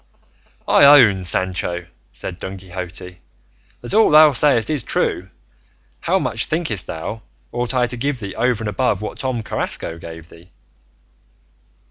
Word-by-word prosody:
"I - - +5
own, 125 -10 +7
Sancho," 90 -1 -1 0.3
said 90 -2 -7
Don 95 +1 -6
Quixote, 90 -1 -8 0.6
"that 120 - -6
all 220 +1 +5
thou 155 0 +7
sayest 120 -2 +3
is 150 -4 -1
true; 95 -4 -2 0.7
how - - +1
much, - - -2
thinkest 155 - -1
thou, 105 +7 -6 0.3
ought 120 +1 -2
I 125 -1 +3
to 120 0 -6
give 135 +1 -2
thee 100 -4 -6
over 120 -2 0
and - - -3
above 105 -2 -1
what - - -6
Tom 130 -4 -2
Carrasco 85 -5 -4
gave 80 -1 -10
thee?" 85 +2 -17
110 Hz, 145 wpm, -19 LUFS, 90-130 Hz, 0.7 s, own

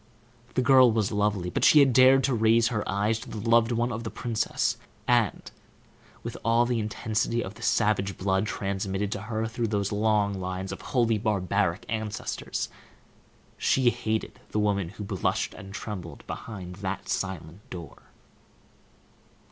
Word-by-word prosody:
The 130 - +2
girl 130 -2 +7
was 110 -2 0
lovely, 105 -4 0
but - - -1
she - - +7
had 135 -3 +5
dared 130 +2 +6
to 135 - +2
raise 115 0 +4
her 110 -4 -1
eyes 105 +3 +1
to - - -10
the - - -6
loved 115 0 +4
one 120 +1 0
of 115 0 -4
the 110 - -4
princess; 115 -2 -1 0.3
and, 120 -4 +1 0.7
with - - -5
all 115 +2 +3
the 120 -1 0
intensity 110 +2 -1
of 95 - -7
the 110 - -15
savage 100 -3 +1
blood 95 +2 +1
transmitted 100 0 -2
to 100 - -3
her 110 +1 -2
through 115 +1 -2 0.2
long 105 -1 +2
lines 95 +1 -4
of - - -7
wholly 115 -5 +1
barbaric 100 -4 0
ancestors, 110 -1 -3 0.9
she 130 -2 +3
hated 110 -2 -3
the - - -3
woman 100 -4 +1
who 105 +3 -8
blushed 100 - -1
and 95 0 -10
trembled 95 -5 -7
behind 90 -5 -7
that 95 -1 -4
silent 95 -2 -3
door. 85 -5 -9
110 Hz, 155 wpm, -27 LUFS, 100-115 Hz, 0.9 s, girl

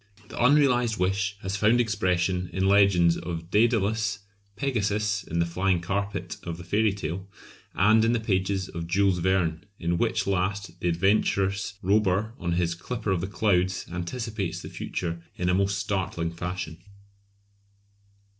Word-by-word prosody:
The - - -2
unrealised 125 -4 +4
wish 95 +2 0
has 95 +1 -2
found 110 +4 +3
expression 90 -5 0
in 95 +2 0
legends 95 -4 +5
of 85 0 -6
Dædalus, 110 -2 +2 0.4
Pegasus, 105 -4 0
in 85 - -4
the 85 - +3
"flying 90 +2 +1
carpet" 100 0 -3
of 85 -1 -5
the 90 - -9
fairy 105 +4 +2
tale, 95 0 -5 0.5
and 110 +3 +5
in 115 - +3
the 120 - +1
pages 95 -3 0
of 85 -1 -6
Jules 95 +1 +2
Verne, 90 -2 +1
in 85 0 -1
which - - +1
last 100 +1 -2
the - - -1
adventurous 100 +2 +1
Robur 105 +2 +2
on 85 -1 -1
his 85 -1 +1
"Clipper 105 +4 -4
of 90 -3 +1
the 95 - -2
Clouds" 95 -3 +1
anticipates 100 +2 -4
the - - -7
future 85 -1 -4
in 90 0 -1
a - - +3
most 100 +1 +1
startling 95 -4 -2
fashion. 90 -1 -5
95 Hz, 150 wpm, -26 LUFS, 90-105 Hz, 0.5 s, legends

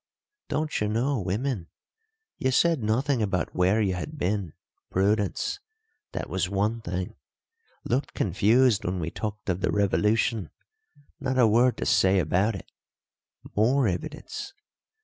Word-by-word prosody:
Don't 155 -4 -1
you 105 - +1
know 120 +5 0
women? 100 0 -2 0.7
You 130 - +1
said 160 +2 +3
nothing 120 +4 +1
about 95 -5 -1
where 95 +4 +3
you 100 -4 +1
had 120 - -5
been 100 - -1 0.4
prudence. 105 - 0 0.5
That - - -3
was 95 -1 -1
one 105 +4 0
thing. 90 -1 -4 0.7
Looked 130 +3 -1
confused 110 +5 +3
when 90 +1 -2
we 85 0 -3
talked 105 -1 -5
of 95 -1 -1
the - - +1
revolution 105 +1 +1 0.7
not 130 0 -1
a 125 - +6
word 120 +3 +4
to - - -3
say 95 +1 +4
about 95 +6 +2
it. 95 - -10 0.8
More 120 +4 +3
evidence. 90 - -5
105 Hz, 135 wpm, -26 LUFS, 95-125 Hz, 0.8 s, a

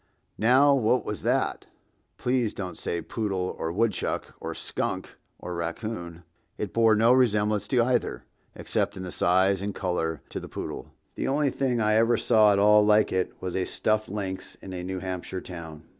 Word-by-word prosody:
Now 130 +6 +5
what 125 -1 +2
was 105 - -4
that? - - 0 0.5
Please 125 -3 0
don't 95 -2 -5
say 85 - -3
poodle 95 -5 -2
or 80 - -2
woodchuck 105 +2 -1
or - - -5
skunk - - -3 0.3
or 90 - -6
raccoon. 85 0 -5 0.3
It - - -4
bore 115 -1 +5
no 115 +3 +5
resemblance 105 -4 +2
to 125 -3 +3
either, 125 0 0 0.3
except, - - -2
in 95 -1 -6
size 95 +2 +2
and 100 0 -3
color, 80 -5 -2
to - - -4
the - - -9
poodle. - - -6 0.2
The - - -3
only 140 0 +1
thing 125 -3 0
I 110 -1 +2
ever 115 +1 +4
saw 110 -3 +5
at 100 - +3
all 105 +1 +6
like 105 0 +4
it 95 -1 -1
was 90 -1 -3
a 95 - 0
stuffed 110 0 0
lynx 95 -2 -5
in 95 - -10
a 90 -1 -5
New 95 +1 -4
Hampshire 95 0 -4
town. 80 -4 -9
105 Hz, 175 wpm, -26 LUFS, 90-115 Hz, 0.5 s, all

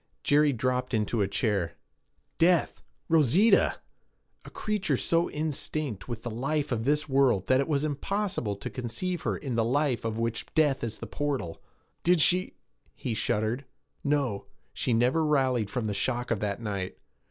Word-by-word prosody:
Jerry 145 0 +4
dropped 125 0 -1
into 110 +1 0
a 100 - +2
chair. 100 -5 -1 0.6
Death! 175 0 +3 0.3
Rosita! 165 - +4 0.7
a - - -10
creature 195 -10 -1
so 170 +5 +1
instinct 150 -6 -3
with 115 -2 -5
the 120 - -4
life 140 +6 -1
of 115 -2 -1
this 150 +2 +1
world 135 -8 +3
that 130 +4 +3
it 140 - 0
was 145 -2 +1
impossible 155 - -1
to 100 - -6
conceive 130 +9 -3
her - - -1
in 135 -4 -4
the 115 -1 +2
life 130 +1 +1
of 110 -1 -2
which 115 0 -2
death 145 -5 +3
is 115 -2 -3
the - - -7
portal. 140 - -3 0.4
'Did 175 0 +4
she 180 +4 +3 0.2
' - - -39
He 120 - 0
shuddered. 110 +4 -1 0.4
'No! 140 -8 0 0.3
She - - -1
never 125 +7 +3
rallied 130 -8 +2
from 125 -4 -2
the 105 - -1
shock 120 +4 -1
of 110 - +1
that 100 0 -2
night. 100 -5 -4
130 Hz, 165 wpm, -28 LUFS, 115-150 Hz, 0.7 s, Jerry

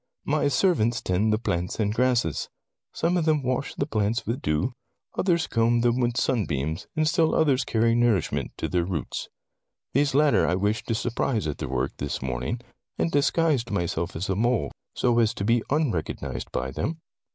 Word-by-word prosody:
"My - - +2
servants 125 - +2
tend 100 +4 +1
the 110 - +3
plants 90 -5 -2
and 105 -1 +1
grasses. 120 - +1 0.4
Some 175 +2 0
of 165 - +1
them 155 -3 +2
wash 130 +2 -2
the 140 - -1
plants 110 -4 0
with 120 +5 -2
dew, 75 +12 0 0.4
others 175 -3 +2
comb 115 0 +2
them 120 +1 +2
with 120 -1 0
sunbeams, 80 - -1
and 155 -1 +2
still 160 -1 +2
others 140 -5 +3
carry 115 0 +2
nourishment 120 -6 +1
to - - -2
their 90 -2 +1
roots. 85 -4 -4 0.6
These 140 0 +2
latter 150 0 +4
I 90 - +2
wished 105 +3 -1
to 115 - 0
surprise 115 - -1
at 75 -2 -3
their 70 - -4
work, 65 +1 -1
this 70 - -3
morning, 65 - -3 0.4
and 165 - 0
disguised 145 -4 +2
myself 85 -2 -2
as 85 +4 -3
a 95 - 0
mole 115 - +1 0.2
so 120 -1 +2
as 110 -2 +2
to 100 - -3
be 115 +2 +3
unrecognized 85 - -2
by 65 +1 -2
them. 135 - -3
115 Hz, 180 wpm, -26 LUFS, 90-135 Hz, 0.6 s, latter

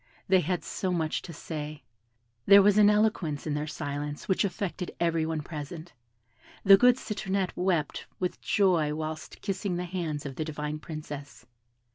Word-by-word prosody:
They 190 0 +5
had 175 -1 -1
so 185 - -2
much 160 -3 -1
to 175 - -9
say. 150 -2 -6 0.6
There 200 0 +9
was 205 +1 +5
an 205 -1 +7
eloquence 210 -8 +1
in 155 - -1
their 150 +1 -2
silence 145 -1 -4
which 190 - +2
affected 185 -1 -3
every 165 -2 +1
one 160 -1 -2
present; 155 +2 -7 0.7
the 195 0 +9
good 250 +4 +6
Citronette 195 -5 -2
wept 175 -5 -1
with 180 -1 -2
joy 170 -7 +2
whilst 155 0 -6
kissing 195 -2 -2
the 180 +1 -2
hands 170 -5 -3
of 135 -2 -6
the 155 - -1
divine 150 -1 -4
Princess. 150 -3 -8
165 Hz, 160 wpm, -28 LUFS, 150-190 Hz, 0.7 s, There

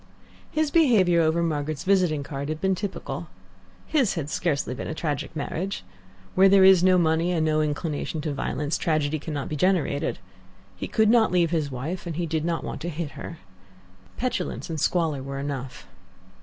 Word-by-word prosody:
His 310 -1 0
behaviour 210 - +4
over 165 +1 +2
Margaret's 155 -1 -2
visiting 180 -6 +2
card 140 +1 -5
had 155 0 -3
been 190 +2 +1
typical. 185 - -5 0.6
His 270 -11 +1
had 150 -3 -4
scarcely 150 -7 -1
been 125 - -6
a 160 - -4
tragic 150 0 -3
marriage. 175 +6 -3 0.5
Where 195 +1 +6
there 195 0 +6
is 190 -2 +7
no 185 0 +5
money 165 +1 +2
and 160 -3 +1
no 155 0 +2
inclination 155 +1 -2
to 150 -1 -2
violence 145 +2 -2
tragedy 155 -1 0
cannot 145 -2 -4
be 155 - -3
generated. 160 -3 +1 0.6
He - - -5
could 220 0 +3
not 230 -4 +4
leave 175 -2 +2
his 155 -4 0
wife, 150 +8 -5
and 165 - -4
he 175 +1 -1
did 160 -1 -1
not 170 -2 -1
want - - -5
to 175 - -3
hit 160 -2 -4
her. 165 - -8 0.8
Petulance 250 -7 -3
and 155 -3 -3
squalor 160 -6 +1
were 135 +1 -6
enough. 135 -2 -5
160 Hz, 180 wpm, -25 LUFS, 150-185 Hz, 0.8 s, is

